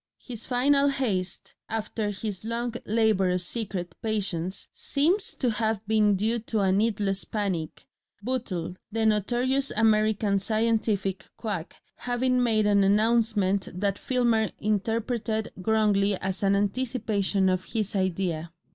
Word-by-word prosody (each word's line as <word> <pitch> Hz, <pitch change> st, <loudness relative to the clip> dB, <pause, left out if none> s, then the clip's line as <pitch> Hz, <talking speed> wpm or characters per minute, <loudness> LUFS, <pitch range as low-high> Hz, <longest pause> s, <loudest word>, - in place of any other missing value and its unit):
His 235 Hz, -3 st, -8 dB
final 275 Hz, +3 st, +3 dB
haste 205 Hz, -10 st, -2 dB, 0.2 s
after 220 Hz, -1 st, -2 dB
his 205 Hz, -1 st, -5 dB
long 235 Hz, +1 st, -2 dB
laborious 195 Hz, -5 st, +2 dB
secret 185 Hz, -5 st, -4 dB
patience 195 Hz, -5 st, -2 dB
seems 345 Hz, +8 st, 0 dB
to 250 Hz, -3 st, 0 dB
have 220 Hz, -1 st, -1 dB
been 210 Hz, -2 st, +3 dB
due 220 Hz, +5 st, 0 dB
to 220 Hz, -1 st, -2 dB
a 190 Hz, -1 st, +3 dB
needless 200 Hz, -1 st, +1 dB
panic, 190 Hz, -7 st, -3 dB, 0.4 s
Bootle, 195 Hz, -8 st, -3 dB
the 225 Hz, +1 st, 0 dB
notorious 245 Hz, +6 st, +1 dB
American 215 Hz, -2 st, +2 dB
scientific 215 Hz, -2 st, 0 dB
quack, 200 Hz, -7 st, -4 dB, 0.2 s
having 250 Hz, +1 st, 0 dB
made 220 Hz, -3 st, +2 dB
an 200 Hz, -1 st, +4 dB
announcement 210 Hz, -2 st, +2 dB
that 200 Hz, 0 st, 0 dB
Filmer 235 Hz, -4 st, +1 dB
interpreted 220 Hz, +1 st, -1 dB
wrongly 205 Hz, 0 st, +2 dB
as 190 Hz, 0 st, -3 dB
an 200 Hz, 0 st, +3 dB
anticipation 205 Hz, -2 st, 0 dB
of 185 Hz, 0 st, 0 dB
his 215 Hz, -3 st, -2 dB
idea. 180 Hz, -3 st, -1 dB
215 Hz, 120 wpm, -27 LUFS, 195-230 Hz, 0.4 s, an